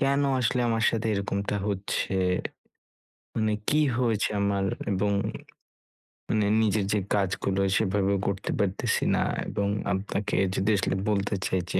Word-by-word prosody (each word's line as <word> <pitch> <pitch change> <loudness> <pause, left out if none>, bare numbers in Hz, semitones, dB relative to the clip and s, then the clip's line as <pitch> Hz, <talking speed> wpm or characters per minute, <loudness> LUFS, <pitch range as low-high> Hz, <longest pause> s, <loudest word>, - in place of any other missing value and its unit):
কেন 140 0 +2 0.2
আসলে 125 +1 +1
আমার 115 -1 +1
সাথে 115 0 -2
এরকমটা 100 +1 -1
হচ্ছে? 100 0 -2 1.2
মানে 110 -1 +1 0.2
কি 150 - +3 0.2
হয়েছে 115 -4 +1
আমার? 100 -1 +1 0.3
এবং 100 +1 +1 1.2
মানে 105 -2 +2 0.2
নিজের 105 -2 +2
যে 105 - +2 0.2
কাজগুলো 95 -1 0 0.2
সেভাবেও 100 +1 +1
করতে 100 0 -2
পারতেছি 100 -2 0
না - - +1 0.3
এবং 100 - -1 0.3
আপনাকে 100 +1 -2 0.2
যদি 95 +3 +1
আসলে 95 - 0
বলতে 100 0 0
চাই 95 - +1
যে - - +2
100 Hz, 130 wpm, -27 LUFS, 100-110 Hz, 1.2 s, কি